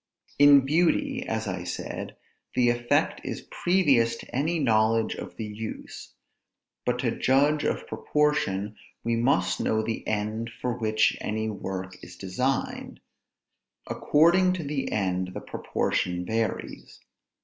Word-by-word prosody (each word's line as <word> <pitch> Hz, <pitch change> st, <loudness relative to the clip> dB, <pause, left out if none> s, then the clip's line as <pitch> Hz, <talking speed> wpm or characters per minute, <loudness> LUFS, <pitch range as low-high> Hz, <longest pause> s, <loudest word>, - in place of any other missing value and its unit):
In 145 Hz, -1 st, +8 dB
beauty, 180 Hz, -, +1 dB
as 110 Hz, 0 st, -2 dB
I 90 Hz, -2 st, -3 dB
said, 90 Hz, -, -5 dB, 0.4 s
the 125 Hz, -1 st, +4 dB
effect 120 Hz, 0 st, +1 dB
is -, -, -6 dB
previous 140 Hz, -11 st, +3 dB
to 120 Hz, -, -10 dB
any 155 Hz, +6 st, +1 dB
knowledge 115 Hz, -4 st, +2 dB
of -, -, -8 dB
the 110 Hz, -, -5 dB
use; 105 Hz, +1 st, -7 dB, 0.8 s
but 125 Hz, 0 st, +2 dB
to 120 Hz, -, +1 dB
judge 145 Hz, +5 st, +2 dB
of -, -, -1 dB
proportion, 110 Hz, -9 st, 0 dB, 0.3 s
we 115 Hz, 0 st, +1 dB
must 130 Hz, +6 st, +1 dB
know 110 Hz, 0 st, +1 dB
the 115 Hz, 0 st, -4 dB
end 110 Hz, +2 st, -2 dB
for 125 Hz, -2 st, -1 dB
which 110 Hz, -2 st, +2 dB
any 110 Hz, +1 st, -2 dB
work 95 Hz, -2 st, -6 dB
is 90 Hz, -, -10 dB
designed. 125 Hz, +9 st, -2 dB, 0.9 s
According 175 Hz, +4 st, +3 dB
to 180 Hz, -3 st, -4 dB
the 140 Hz, -2 st, -3 dB
end, 95 Hz, -2 st, -1 dB
the -, -, -3 dB
proportion 90 Hz, 0 st, -2 dB
varies. 110 Hz, +2 st, -3 dB
115 Hz, 130 wpm, -27 LUFS, 105-145 Hz, 0.9 s, In